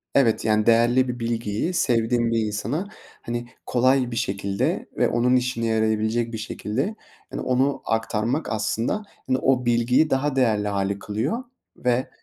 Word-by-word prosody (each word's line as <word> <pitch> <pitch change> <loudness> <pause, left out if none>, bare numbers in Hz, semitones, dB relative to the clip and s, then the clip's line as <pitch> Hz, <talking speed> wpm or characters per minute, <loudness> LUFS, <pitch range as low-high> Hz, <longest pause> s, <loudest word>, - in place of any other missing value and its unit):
Evet, 115 -5 +3
yani, 110 -1 +2
değerli 120 +3 +4
bir 125 0 -4
bilgiyi 115 - -2
sevdiğim 120 -5 +1
bir 115 - +2
insana, 120 - -2 0.3
hani, 120 0 -4 0.2
kolay 130 0 +2
bir - - -4
şekilde 100 -1 -1
ve - - +3
onun 125 +2 +2
işine 125 -2 0
yarayabilecek 110 +1 0
bir - - -2
şekilde, 120 - -3 0.4
yani, - - -4
onu 130 +2 +1
aktarmak 115 +5 -1
aslında, 115 - -1 0.2
hani, 130 0 +2
o 130 -2 +1
bilgiyi 120 +6 +3
daha 135 +1 0
değerli 110 -5 +2
hâle 100 0 -1
kılıyor 125 - -2 0.3
ve 125 +1 0
120 Hz, 145 wpm, -24 LUFS, 110-130 Hz, 0.4 s, değerli